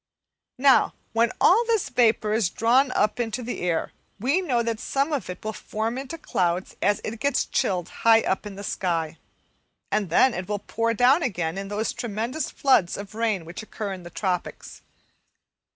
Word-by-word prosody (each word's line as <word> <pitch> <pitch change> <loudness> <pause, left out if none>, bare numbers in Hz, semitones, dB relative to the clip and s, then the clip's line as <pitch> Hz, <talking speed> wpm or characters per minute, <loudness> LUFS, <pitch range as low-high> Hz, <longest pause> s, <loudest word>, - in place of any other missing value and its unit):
Now, 270 0 +4 0.2
when 230 0 +3
all 435 +6 +5
this 450 -4 +1
vapour 220 -3 +2
is 220 -5 +2
drawn 255 +6 +3
up 210 +3 +1
into 240 +1 -2
the 245 - -5
air, 175 -2 -1 0.3
we 275 - +1
know 250 -10 0
that 230 -1 -2
some 280 +5 -1
of 275 -9 -2
it 180 +3 -8
will 220 - -2
form 220 +3 -3
into 270 +5 -6
clouds 180 - -1
as 205 +1 +2
it 220 +1 -5
gets 280 +1 +1
chilled 185 -8 -1
high 225 0 +6
up 190 +1 -1
in 200 - -8
the 200 - -8
sky, 165 -5 -2 0.7
and 205 -3 0
then 250 +9 +4
it 180 +1 -5
will 205 - 0
pour 230 +3 -1
down 255 +8 +5
again 175 - -2
in 195 0 -5
those 210 +2 -2
tremendous 235 +6 -3
floods 255 -11 +2
of 200 0 -8
rain 215 -6 -1
which 170 +5 -7
occur 215 -2 -5
in 185 - -8
the 175 - -10
tropics. 180 -2 -4
220 Hz, 185 wpm, -25 LUFS, 190-250 Hz, 0.7 s, high